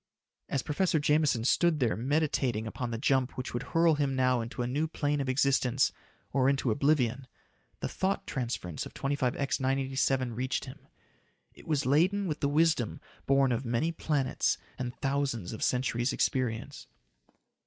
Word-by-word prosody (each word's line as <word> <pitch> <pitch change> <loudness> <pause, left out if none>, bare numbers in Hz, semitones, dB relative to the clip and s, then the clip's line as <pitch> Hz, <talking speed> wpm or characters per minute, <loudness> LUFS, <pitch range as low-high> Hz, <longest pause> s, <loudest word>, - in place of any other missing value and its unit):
As 135 - -1
Professor 165 +2 +1
Jameson 150 -5 +2
stood 160 +5 +3
there 120 -4 +1
meditating 130 -3 0
upon 120 +2 -4
the 115 - -3
jump 130 0 +1
which 130 - -4
would 120 - -2
hurl 165 0 +3
him 140 -3 0
now 130 -2 +2
into 120 +2 -4
a - - -2
new 145 +6 0
plane 145 -2 -1
of 135 - -2
existence 130 -1 +2 0.4
or 135 0 +3
into 135 -3 +1
oblivion, 135 -1 +1 0.5
the - - -1
thought 190 +1 -1
transference 115 - -4
of - - -17
25X 135 0 -1
987 135 -1 0
reached 130 +4 -2
him. 135 +1 -12 0.7
It - - -16
was 150 -5 0
laden 180 +9 +3
with 155 -4 -2
the 140 - +1
wisdom 155 -6 +2 0.3
born 135 -1 +4
of 120 +2 -1
many 125 +7 0
planets 145 -5 0 0.2
and 125 -1 -2
thousands 135 -9 -1
of 110 - -7
centuries' 125 0 0
experience. 125 -4 -1
135 Hz, 155 wpm, -30 LUFS, 125-145 Hz, 0.7 s, born